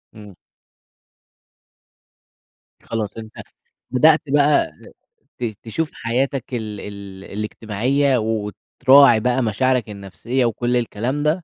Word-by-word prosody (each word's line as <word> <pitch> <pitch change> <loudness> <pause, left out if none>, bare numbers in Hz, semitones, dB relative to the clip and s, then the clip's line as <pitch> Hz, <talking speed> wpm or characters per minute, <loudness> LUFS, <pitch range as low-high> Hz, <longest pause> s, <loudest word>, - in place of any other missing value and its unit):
امم. 105 -3 -12 2.5
خلاص 110 -2 -4
أنت 110 -1 -9 0.6
بدأت 155 +4 +5
بقى 145 - +3 0.7
ت - - -5 0.2
تشوف 150 +8 -3
حياتك 130 +3 -2
ال 110 -3 -4
ال 100 -1 -9
الاجتماعية، 115 +6 -1
وتراعي 115 +4 +3
بقى 125 +3 +1
مشاعرك 120 +2 0
النفْسيّة 105 +6 -3
وكل 120 +2 0
الكلام 120 +3 -2
ده، 155 +4 0
120 Hz, 95 wpm, -20 LUFS, 105-135 Hz, 2.5 s, بدأت